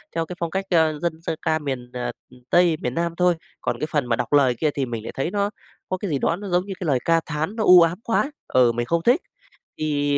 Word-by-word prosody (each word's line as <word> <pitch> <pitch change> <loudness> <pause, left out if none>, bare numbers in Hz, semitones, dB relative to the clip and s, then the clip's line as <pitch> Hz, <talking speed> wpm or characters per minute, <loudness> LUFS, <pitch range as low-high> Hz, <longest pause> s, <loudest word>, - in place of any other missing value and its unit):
theo 165 0 0
cái 180 - -7
phong 170 -1 -1
cách, 195 0 -2
ơ, 160 -4 +2
dân 165 -1 -3
dân 165 - -2
ca 160 0 +1
miền, 130 -4 -4
ờ, 125 -1 -3 0.4
Tây, 175 -3 +4
miền 125 - -2
Nam 170 0 -1
thôi. 180 -1 +3 0.3
Còn - - -2
cái 155 - -2
phần 145 -4 +1
mà 120 -1 +1
đọc 120 +4 -3
lời 130 -4 +4
kia 155 - +3
thì 135 -2 0
mình 115 -3 -5
lại - - -6
thấy 135 +6 -2
nó 205 0 0 0.4
có 185 - -1
cái 185 -3 -4
gì 140 - +1
đó 165 - +1
nó 200 +2 -7
giống 180 +1 +1
như 195 - -5
cái 180 - -4
lời 130 -4 +2
ca 165 0 +4
thán 160 +7 -3
nó 220 - -1
u 180 -2 +8
ám 165 +4 +2
quá, 270 +5 0 0.2
ừ, 125 -2 +4
mình 120 +1 -2
không 170 +5 0
thích. 255 +9 +4 0.6
Thì 145 -2 +1
160 Hz, 270 wpm, -23 LUFS, 140-180 Hz, 0.6 s, u